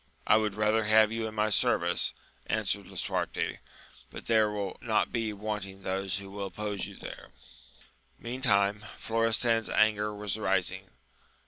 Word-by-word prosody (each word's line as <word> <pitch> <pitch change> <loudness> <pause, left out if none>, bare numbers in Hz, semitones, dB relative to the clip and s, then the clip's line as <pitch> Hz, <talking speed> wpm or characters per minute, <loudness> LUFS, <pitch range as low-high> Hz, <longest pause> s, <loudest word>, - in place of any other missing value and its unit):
I 105 - +5
had 105 -2 -1
rather 105 +1 +2
have 110 0 +5
you 115 0 -2
in 110 - -8
my 105 0 +1
service, - - +3 0.3
answered - - 0
Lisuarte; - - -2 0.5
but - - -10
there 110 -2 +3
will 100 -2 -4
not 110 -2 +1
be 115 -2 -1
wanting 100 -2 -5
those 95 0 -1
who 100 -1 -8
will 100 0 -4
oppose 105 0 -4
you - - -11
there. - - -9 0.9
Meantime 105 -4 +1
Florestan's 115 0 +2
anger 105 -1 +2
was 105 0 -3
rising. 95 -3 0
105 Hz, 140 wpm, -29 LUFS, 100-110 Hz, 0.9 s, I